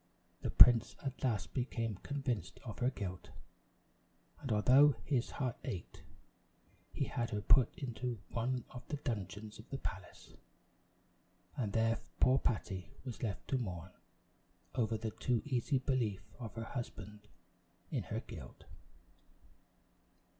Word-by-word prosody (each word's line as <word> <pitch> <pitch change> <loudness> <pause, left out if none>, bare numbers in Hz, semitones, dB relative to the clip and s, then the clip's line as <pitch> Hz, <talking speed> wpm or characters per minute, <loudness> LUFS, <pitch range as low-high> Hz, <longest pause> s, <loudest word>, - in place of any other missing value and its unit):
The - - -1
prince 120 -1 +8
at 135 -1 -4
last 115 -6 0
became 115 -5 -1
convinced 130 - -2
of 115 -5 -7
her 125 - +3
guilt; 95 -8 -5 1.1
and 135 -4 -4
although 130 +7 +7
his 125 -5 +1
heart 130 -4 -2
ached, 90 -4 -5 0.9
he - - -1
had 120 -1 -2
her 105 -1 -2
put 125 +2 +6
into 125 -2 -3
one 125 +1 -1
of 125 - -7
the 150 - -2
dungeons 105 -5 -4
of 110 - -12
the 135 - -3
palace; 95 -7 -7 1.2
and 110 -6 -1
there 115 0 +3 0.2
poor 130 +1 +6
Patty 95 -6 -1 0.2
was 125 -4 -6
left 105 -5 -3
to 135 - +2
mourn 90 -6 -4 0.8
over 115 -3 +1
the 110 0 -3
too 120 0 0
easy 135 0 +1
belief 120 -7 0 0.2
of 115 -4 -6
her 115 - -3
husband 105 -4 -6 0.6
in - - 0
her - - -2
guilt. - - -10
115 Hz, 130 wpm, -36 LUFS, 105-130 Hz, 1.2 s, prince